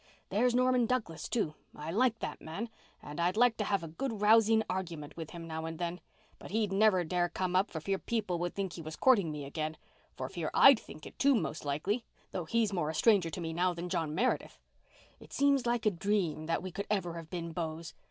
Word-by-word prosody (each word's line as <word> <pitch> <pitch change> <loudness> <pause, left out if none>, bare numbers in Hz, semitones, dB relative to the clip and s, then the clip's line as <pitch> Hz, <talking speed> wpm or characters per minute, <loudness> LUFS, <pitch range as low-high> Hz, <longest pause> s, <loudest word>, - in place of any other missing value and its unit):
There's 240 +5 +2
Norman 250 -1 +3
Douglas, 215 -10 -2
too—I 155 -6 -3
like 235 +4 +2
that 150 - -4
man, 195 +9 -5 0.3
and 150 +3 -7
I'd 175 +4 +1
like 245 -1 +5
to 210 - 0
have 200 -3 0
a - - -5
good 220 +8 -4
rousing 220 +1 +5
argument 165 -5 -4
with 160 -2 -6
him 170 -1 -8
now 160 0 -4
and 165 0 -5
then. 175 0 -3 0.4
But - - -10
he'd 215 0 0
never 195 -3 +4
dare 175 +1 0
come 180 +1 -2
up 190 +2 +3
for 160 - -5
fear 195 +4 -1
people 210 -7 -2
would 175 0 -2
think 195 -3 -2
he 170 - -7
was 155 0 -7
courting 205 -11 +4
me 150 -2 -5
again—for 155 +2 -6
fear - - -3
I'd 270 -4 +8
think 155 - -12
it, - - -12
too, 280 0 +5
most 160 -7 -2
likely—though 180 - -3
he's 220 +4 +1
more 170 -5 0
a 160 - -3
stranger 200 -3 +4
to 175 - -5
me 165 -1 -3
now 180 +1 +1
than 175 +1 -5
John 165 -4 -1
Meredith. 250 +8 0 0.6
It - - -14
seems 280 -3 +3
like 240 -1 0
a 215 - +5
dream 175 -4 -1
that 165 - 0
we 185 - -5
could 200 +3 -5
ever 190 -5 0
have 165 -2 -8
been 170 -2 -4
beaus. 160 -1 -4
180 Hz, 220 wpm, -32 LUFS, 165-220 Hz, 0.6 s, I'd